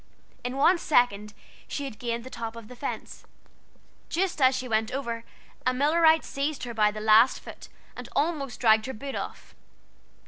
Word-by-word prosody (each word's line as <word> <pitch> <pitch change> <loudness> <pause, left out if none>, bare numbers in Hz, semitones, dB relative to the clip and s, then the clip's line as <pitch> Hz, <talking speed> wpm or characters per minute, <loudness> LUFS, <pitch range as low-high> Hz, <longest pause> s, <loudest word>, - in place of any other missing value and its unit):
In 250 +2 -3
one 345 +6 +4
second 210 -9 +1 0.3
she 285 - -4
had 230 -6 -8
gained 235 -1 -3
the 260 - -10
top 225 -1 -5
of 230 -2 -10
the 250 - -10
fence. 275 - -6 0.9
Just 355 -3 -1
as 260 0 +5
she 255 0 -3
went 220 0 0
over 235 -4 -3 0.4
a 255 0 +1
Millerite 320 +4 +4
seized 280 +1 -3
her 240 -1 -5
by 210 -2 +3
the 210 0 -6
last 220 +3 +5
foot, - - -11 0.3
and - - -8
almost 285 -5 -1
dragged 220 -1 +4
her 265 - -4
boot 270 +4 -6
off. - - -7
250 Hz, 175 wpm, -27 LUFS, 225-280 Hz, 0.9 s, as